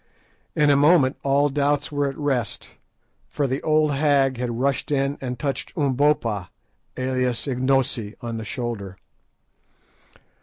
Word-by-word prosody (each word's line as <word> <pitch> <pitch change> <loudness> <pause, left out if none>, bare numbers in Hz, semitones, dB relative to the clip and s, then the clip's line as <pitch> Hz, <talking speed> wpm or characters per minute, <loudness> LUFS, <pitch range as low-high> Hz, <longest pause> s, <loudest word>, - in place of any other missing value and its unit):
In 150 -1 +4
a - - +5
moment 145 -2 +4
all 140 +1 +2
doubts 145 +1 0
were 145 -1 0
at 135 - -8
rest, 135 -7 -2 0.6
for 145 - -1
the 135 +1 -2
old 155 -1 +2
hag 140 -2 +2
had 120 -1 -3
rushed 135 -1 0
in 140 -1 0
and 125 -2 -4
touched 140 +3 -3
Umbopa, 130 - +1 0.5
alias 130 -1 -1
Ignosi, 130 -4 0
on 115 -2 -5
the 110 - -5
shoulder. 110 -5 -5
135 Hz, 130 wpm, -23 LUFS, 125-145 Hz, 0.6 s, a